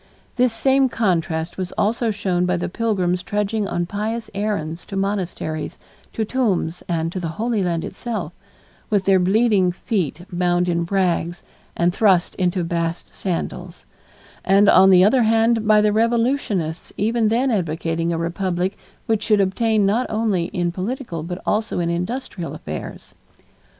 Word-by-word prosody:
This 250 Hz, -1 st, +3 dB
same 265 Hz, +4 st, +3 dB
contrast 170 Hz, -6 st, -1 dB
was 185 Hz, -1 st, -3 dB
also 230 Hz, +2 st, 0 dB
shown 185 Hz, -4 st, 0 dB
by 180 Hz, 0 st, +1 dB
the -, -, -2 dB
pilgrims 185 Hz, -4 st, 0 dB
trudging 205 Hz, +2 st, -1 dB
on 175 Hz, -2 st, -1 dB
pious 220 Hz, +4 st, -4 dB
errands 195 Hz, -6 st, -2 dB
to 195 Hz, -, -6 dB
monasteries, 190 Hz, -5 st, -3 dB, 0.4 s
to 220 Hz, -, -1 dB
tombs, 200 Hz, -9 st, -1 dB
and 165 Hz, -1 st, -1 dB
to 185 Hz, -, -4 dB
the 170 Hz, -, -3 dB
Holy 225 Hz, -1 st, 0 dB
Land 170 Hz, -3 st, -1 dB
itself, 210 Hz, -9 st, -5 dB, 0.6 s
with 205 Hz, -3 st, +2 dB
their 195 Hz, -1 st, +5 dB
bleeding 195 Hz, 0 st, +3 dB
feet 175 Hz, -, -3 dB
bound 175 Hz, 0 st, +1 dB
in 170 Hz, -1 st, 0 dB
rags 175 Hz, -2 st, 0 dB, 0.3 s
and 175 Hz, +1 st, +2 dB
thrust 190 Hz, -4 st, +3 dB
into 180 Hz, -1 st, 0 dB
bast 170 Hz, 0 st, -3 dB
sandals, 180 Hz, -1 st, -4 dB, 0.6 s
and, 195 Hz, +1 st, +4 dB
on 190 Hz, -1 st, +7 dB
the 185 Hz, -1 st, +7 dB
other 245 Hz, +6 st, +4 dB
hand, 225 Hz, 0 st, +2 dB
by 215 Hz, -1 st, +6 dB
the 210 Hz, 0 st, +2 dB
revolutionists 230 Hz, -, 0 dB
even 225 Hz, +2 st, +1 dB
then 245 Hz, +4 st, +2 dB
advocating 165 Hz, -3 st, -1 dB
a 165 Hz, -, -1 dB
Republic 180 Hz, +3 st, -2 dB, 0.3 s
which 220 Hz, -2 st, +1 dB
should 210 Hz, -1 st, +2 dB
obtain 210 Hz, +2 st, +2 dB
not 225 Hz, +6 st, +1 dB
only 215 Hz, -6 st, 0 dB
in 175 Hz, -2 st, -2 dB
political 190 Hz, -, -4 dB
but 175 Hz, +3 st, -5 dB
also 215 Hz, +1 st, 0 dB
in 170 Hz, -1 st, 0 dB
industrial 180 Hz, -, -4 dB
affairs. 75 Hz, -, -7 dB
190 Hz, 150 wpm, -21 LUFS, 175-220 Hz, 0.6 s, on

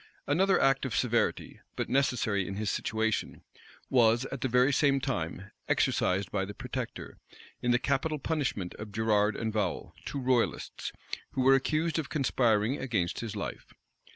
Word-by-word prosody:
Another 190 Hz, +7 st, +3 dB
act 135 Hz, 0 st, +3 dB
of 130 Hz, -4 st, -2 dB
severity, 120 Hz, -2 st, 0 dB, 0.2 s
but -, -, -2 dB
necessary 115 Hz, -8 st, +1 dB
in 95 Hz, -, -4 dB
his 105 Hz, 0 st, -1 dB
situation, 110 Hz, 0 st, -1 dB, 0.4 s
was, 120 Hz, -1 st, +4 dB
at 135 Hz, -, -5 dB
the -, -, +1 dB
very 125 Hz, +3 st, +3 dB
same 140 Hz, 0 st, +3 dB
time, 100 Hz, -, -3 dB, 0.2 s
exercised 95 Hz, +1 st, +1 dB
by 100 Hz, -2 st, 0 dB
the 100 Hz, +1 st, -6 dB
protector, -, -, -6 dB, 0.4 s
in 125 Hz, -, 0 dB
the 120 Hz, -, +5 dB
capital 140 Hz, +4 st, 0 dB
punishment 135 Hz, -, -2 dB
of 105 Hz, 0 st, -7 dB
Gerard 105 Hz, -1 st, +2 dB
and 110 Hz, -2 st, -2 dB
Vowel, 100 Hz, -5 st, -2 dB
two 140 Hz, -, -4 dB
royalists, 125 Hz, -2 st, 0 dB, 0.4 s
who 130 Hz, -, 0 dB
were 135 Hz, +1 st, +6 dB
accused 155 Hz, +5 st, +1 dB
of 155 Hz, -, -4 dB
conspiring 125 Hz, -4 st, +1 dB
against 110 Hz, -10 st, -1 dB
his 115 Hz, -4 st, -5 dB
life. -, -, -6 dB
120 Hz, 155 wpm, -30 LUFS, 105-135 Hz, 0.4 s, were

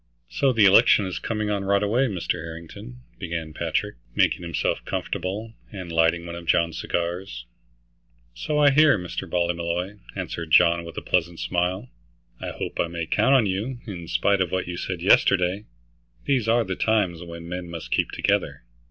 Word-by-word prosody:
"So 135 Hz, -2 st, +2 dB
the 115 Hz, -4 st, +4 dB
election 100 Hz, +1 st, +6 dB
is 95 Hz, -, -4 dB
coming 105 Hz, -2 st, -2 dB
on 100 Hz, -1 st, -1 dB
right 100 Hz, +1 st, +2 dB
away, 120 Hz, +6 st, +2 dB
Mr. 95 Hz, -7 st, -2 dB
Harrington," 90 Hz, +9 st, -10 dB, 0.2 s
began 80 Hz, -4 st, -4 dB
Patrick, -, -, -2 dB, 0.2 s
making -, -, +2 dB
himself 85 Hz, -1 st, -2 dB
comfortable, 105 Hz, +5 st, -4 dB, 0.2 s
and 95 Hz, -4 st, -7 dB
lighting 80 Hz, +1 st, +2 dB
one 85 Hz, -, -6 dB
of 85 Hz, -1 st, -8 dB
John's 85 Hz, -1 st, +2 dB
cigars. 85 Hz, -8 st, -3 dB, 0.9 s
"So 150 Hz, -, -2 dB
I 145 Hz, -1 st, +6 dB
hear, 150 Hz, -3 st, +5 dB
Mr. 90 Hz, -2 st, -6 dB
Ballymolloy," 85 Hz, +3 st, -1 dB, 0.2 s
answered 80 Hz, -2 st, -5 dB
John 85 Hz, +1 st, +5 dB
with 85 Hz, -, -10 dB
a -, -, -4 dB
pleasant 85 Hz, -1 st, 0 dB
smile. 90 Hz, +6 st, -1 dB, 0.5 s
"I -, -, -5 dB
hope -, -, -6 dB
I -, -, +2 dB
may 85 Hz, -1 st, -4 dB
count 135 Hz, +11 st, +3 dB
on 125 Hz, -5 st, +4 dB
you, 105 Hz, +7 st, -2 dB
in 90 Hz, -7 st, -7 dB
spite 100 Hz, +2 st, +2 dB
of 90 Hz, -, +1 dB
what 95 Hz, -1 st, -1 dB
you 90 Hz, -, -4 dB
said 90 Hz, 0 st, -4 dB
yesterday. 95 Hz, +1 st, +3 dB, 0.6 s
These 130 Hz, -6 st, +1 dB
are 115 Hz, +1 st, +3 dB
the 95 Hz, -3 st, -4 dB
times 95 Hz, -7 st, +1 dB
when 85 Hz, -1 st, -9 dB
men 90 Hz, 0 st, -5 dB
must 85 Hz, -1 st, -7 dB
keep -, -, +1 dB
together." -, -, -1 dB
90 Hz, 175 wpm, -24 LUFS, 85-105 Hz, 0.9 s, election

